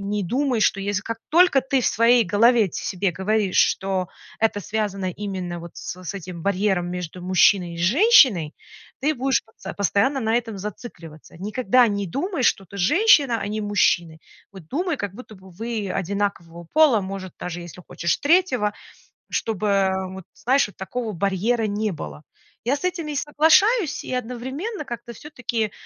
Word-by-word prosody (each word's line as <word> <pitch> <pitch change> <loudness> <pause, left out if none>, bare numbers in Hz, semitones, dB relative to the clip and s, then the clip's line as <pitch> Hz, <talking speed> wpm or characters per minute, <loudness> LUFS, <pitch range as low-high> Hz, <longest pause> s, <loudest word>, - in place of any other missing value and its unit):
не 200 0 -2
думай, 255 +4 0
что 195 - +2
если 200 0 -2
как 230 0 -5
только 340 -4 +5
ты 265 +1 +1
в - - -1
своей 230 +1 +4
голове 220 +2 +4
себе 185 0 -2
говоришь, 200 +1 0
что 190 -2 +1 0.3
это 220 -2 +1
связано 200 -2 -2
именно 185 -3 -5
вот 170 0 -11
с 185 - -7
с 180 - -5
этим 180 -3 -7
барьером 195 -2 0
между 180 0 -6
мужчиной 180 -1 +3
и - - -8
женщиной, 215 - +5 0.5
ты 300 +4 +1
будешь 265 -1 0
потсо 225 - -10
постоянно 200 - +1
на 225 -1 0
этом 225 -4 -3
зацикливаться. 170 -7 -9
Никогда 240 +5 +2
не 200 -1 -2
думай, 325 - -2
что 195 - +2
ты 200 - -11
женщина, 280 - +4
а - - -5
они 210 +1 -3
мужчины. 175 -6 +1 0.3
Вот 190 -5 -12
думай, 345 - -1
как 205 -5 -5
будто 220 -2 -12 0.2
вы 225 -4 -3
одинакового 180 -3 -3
пола, 300 -8 +5
может, 190 -1 -7
даже 175 0 -5
если 175 +1 -10
хочешь, 170 - -1
третьего, 285 - +2 0.6
чтобы, 215 -2 -2
э, 190 -1 +1
вот 190 0 -9
знаешь, 265 0 +2
вот 205 - -16
такого 220 +4 -4
барьера 200 +5 0
не 210 +1 -1
было". 150 -2 -8 0.4
Я 255 +5 +1
с - - -12
этим 350 -4 -2
и 300 - -4
соглашаюсь, 320 - +3
и - - -6
одновременно 260 - -4
как-то 235 -1 -7
все-таки, 240 -5 -4
210 Hz, 165 wpm, -23 LUFS, 190-255 Hz, 0.6 s, только